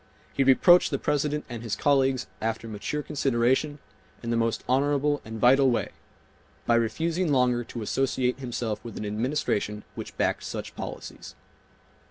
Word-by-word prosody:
He 135 - +2
reproached 175 +7 +6
the 140 - -1
President 150 +1 -1
and 120 -2 -6
his 115 -2 -2
colleagues 135 -2 +2 0.2
after 115 +1 -2
mature 110 +8 -4
consideration, 135 +1 +1 0.5
in 115 - -2
the - - +1
most 115 -1 0
honorable 145 +3 +2
and 110 0 -7
vital 135 +3 +5
way,—by 120 0 -5
refusing 160 +9 +1
longer 125 -3 +2
to 115 -1 -6
associate 130 +2 0
himself 120 -4 -3
with 115 -3 -8
an 105 - -4
Administration 105 -2 -1
which - - -8
backed - - 0
such - - -6
policies. - - -8
125 Hz, 145 wpm, -26 LUFS, 115-145 Hz, 0.5 s, reproached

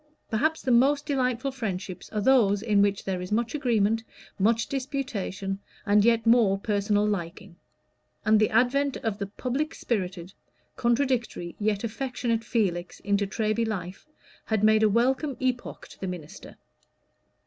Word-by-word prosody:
Perhaps 315 +9 0
the 260 - 0
most 280 +4 +4
delightful 260 -2 0
friendships 195 -7 -5
are 210 - -2
those 205 -4 +4
in 210 -3 +3
which 200 -1 +1
there 185 -2 -2
is 180 - -7
much 230 +2 0
agreement, 225 -6 +1 0.4
much 225 +4 +2
disputation, 245 -8 -3 0.3
and 205 -1 +4
yet 230 0 +3
more 230 -4 +4
personal 205 0 +1
liking; 195 -1 -4 0.7
and 215 -1 +5
the 215 - +3
advent 260 +5 +2
of 220 -3 -3
the 200 - -3
public 260 +9 -3
spirited, 185 -4 -3 0.4
contradictory, 240 -7 0
yet 210 0 0
affectionate 235 -1 -2
Felix, 185 -7 -1
into 200 0 0
Treby 215 +2 0
life, 195 +2 -5 0.4
had 220 -2 0
made 215 0 +5
a 215 - +5
welcome 260 +5 +1
epoch 255 -2 -3
to - - -15
the 190 - -4
minister. 175 -4 -8
220 Hz, 145 wpm, -26 LUFS, 200-250 Hz, 0.7 s, and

